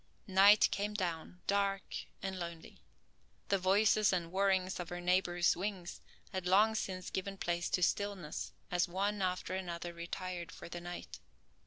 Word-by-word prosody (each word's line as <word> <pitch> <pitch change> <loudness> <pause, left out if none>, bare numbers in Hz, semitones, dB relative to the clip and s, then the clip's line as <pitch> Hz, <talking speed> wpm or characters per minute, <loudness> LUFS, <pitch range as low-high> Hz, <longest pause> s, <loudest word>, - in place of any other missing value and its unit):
Night 200 +1 +7
came 205 +1 -2
down, 180 -2 -3
dark 200 -1 +1 0.4
and 190 -1 -3
lonely. 170 -1 -7 0.7
The 195 - +3
voices 205 +3 +4
and 170 -3 -1
whirrings 190 -1 +1
of 175 - -5
her 175 0 -4
neighbors' 175 -1 +2
wings 185 -1 -4 0.3
had 185 -1 -2
long 210 +4 +5
since 185 -4 -3
given 195 +1 -3
place 175 -1 -1
to 180 - +1
stillness 195 -5 -1 0.2
as 180 +1 +2
one 200 +3 -1
after 185 0 -1
another 175 -2 -4
retired 170 0 -5
for - - -9
the 175 0 -6
night. 175 0 -7
185 Hz, 150 wpm, -34 LUFS, 175-195 Hz, 0.7 s, Night